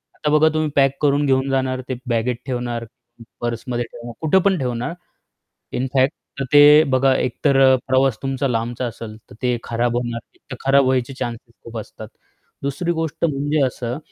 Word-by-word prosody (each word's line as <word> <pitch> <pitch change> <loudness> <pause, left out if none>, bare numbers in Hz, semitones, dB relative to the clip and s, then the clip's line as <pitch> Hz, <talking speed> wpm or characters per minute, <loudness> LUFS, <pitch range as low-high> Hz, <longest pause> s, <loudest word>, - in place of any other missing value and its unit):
आता 150 - -2
बघा, 155 +1 +5
तुम्ही 155 -1 0
पॅक 135 -1 +3
करून 145 0 +2
घेऊन 135 0 +2
जाणार, 130 -1 0
ते 130 - -1
बॅगेट 120 +1 0
ठेवणार, 120 -2 -3 0.6
पर्समध्ये 120 +1 -2
ठेवणार 120 0 -9
कुठे 160 +4 +3
पण 195 -2 +3
ठेवणार, 125 +3 -2 0.8
इन 125 - -1
फॅक्ट, 130 +1 +3 0.3
तर 135 - 0
ते 145 +1 +8
बघा, 130 +1 +3
एकतर 135 +2 +1
अ, 130 -1 +6
प्रवास 130 -3 +2
तुमचा 135 0 -1
लांबचा 120 +1 -2
असेल, 110 -2 -7
तर - - -12
ते 125 -1 +1
खराब 120 +1 -1
होणार. 120 -1 -2 0.3
तर 130 - -5
खराब 135 0 +5
व्हायचे 130 0 0
चान्सेस 115 0 -5
खूप 115 -1 -7
असतात. 110 - -9 0.5
दुसरी 140 +5 -1
गोष्ट 160 0 -3
म्हणजे 145 0 0
असं, 125 +1 -4
130 Hz, 170 wpm, -21 LUFS, 120-140 Hz, 0.8 s, ते